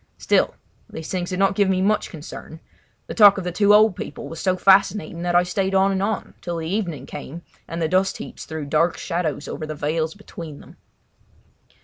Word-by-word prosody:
Still, - - +1 0.3
these 160 - -7
things 180 -2 -2
did 185 - -3
not 195 +1 +3
give 200 -1 +2
me 185 -1 +2
much 205 +3 +1
concern. 160 0 -9 0.5
The - - -6
talk 205 -3 +7
of 190 - -3
the 180 - -3
two 205 +3 +3
old 210 -2 +6
people 145 - -7
was 165 - -8
so 185 -1 +1
fascinating 195 -2 +3
that 175 0 -1
I 175 - +6
stayed 190 +1 -1
on 195 +1 +4
and 190 -1 -1
on, 205 +1 -2
till 175 -1 -4
the 160 -1 -4
evening 175 -5 -3
came 170 +5 -8 0.2
and 165 - -5
the 160 - +1
dust 185 +3 +1
heaps - - -9
threw 160 -2 -5
dark 155 +4 +1
shadows 165 -5 -3
over 155 - -5
the 155 - -5
vales 155 +3 -2
between 165 -7 -9
them. - - -16
180 Hz, 210 wpm, -22 LUFS, 160-195 Hz, 0.5 s, talk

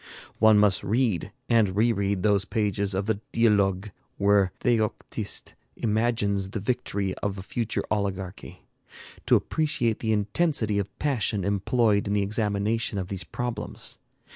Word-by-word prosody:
One 110 -1 +6
must 105 -2 +4
read 110 -4 0 0.2
and 110 -5 +3
re 115 +3 +3
read 100 -3 -1
those 100 -2 +3
pages 100 -3 0
of 95 +1 -1
the 110 -2 0
'Dialogues' 105 -3 +2 0.3
where 100 -2 +3
Theoctiste 115 -4 -1 0.2
imagines 105 -3 0
the 105 - -4
victory 100 -4 -1
of 100 -1 -2
a 95 - -6
future 115 +2 -2
oligarchy, 95 -3 -3 0.6
to - - +6
appreciate 150 -8 0
the 110 - -1
intensity 110 0 +1
of 100 0 -5
passion 110 -9 0
employed 100 +1 +2
in 100 - 0
the 105 -1 +2
examination 105 +1 -1
of 95 -1 -3
these 95 -3 -3
problems. 120 +7 -5
105 Hz, 140 wpm, -26 LUFS, 100-115 Hz, 0.6 s, One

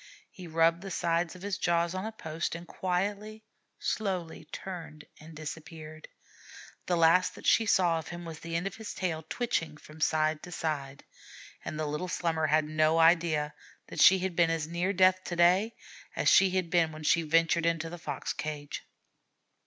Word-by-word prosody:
He 180 -2 -10
rubbed 165 +1 +2
the 195 - -7
sides 170 -1 0
of 185 - -12
his 200 -1 -3
jaws 170 -1 +1
on 185 +2 -3
a - - -5
post, 165 -6 -4
and 170 +1 -8
quietly, 205 +5 -3 0.3
slowly 185 -7 -3
turned 160 -3 -8
and 155 +1 -13
disappeared. 155 0 -8 0.8
The 180 - +2
last 165 +2 +4
that - - -12
she 225 - +4
saw 175 -5 +3
of 160 - -9
him 175 0 -7
was 165 -2 -8
the 165 0 -6
end 170 +3 -1
of 195 - -4
his 220 -1 -7
tail 165 -4 -2
twitching 160 -11 -2
from 150 +1 -14
side 155 0 +1
to 180 - -10
side; 140 -5 -4 0.6
and 155 - -5
the 155 - -1
little 150 +5 -3
Slummer 165 -3 0
had 155 +1 +3
no 155 +1 +2
idea 165 -3 +3 0.4
that - - -2
she 190 - +8
had 185 -1 -3
been 170 -1 +4
as 165 -2 -1
near 175 +3 -1
death 185 -1 +4
to 175 - -4
day, 180 +6 +3 0.4
as - - -1
she 190 0 +6
had 185 -2 -1
been 170 -3 +3
when 155 0 -9
she 165 +2 +3
ventured 165 +1 +2
into 165 -1 0
the 175 +1 -8
fox 145 -4 -4
cage. 150 -1 -5
165 Hz, 185 wpm, -29 LUFS, 155-185 Hz, 0.8 s, she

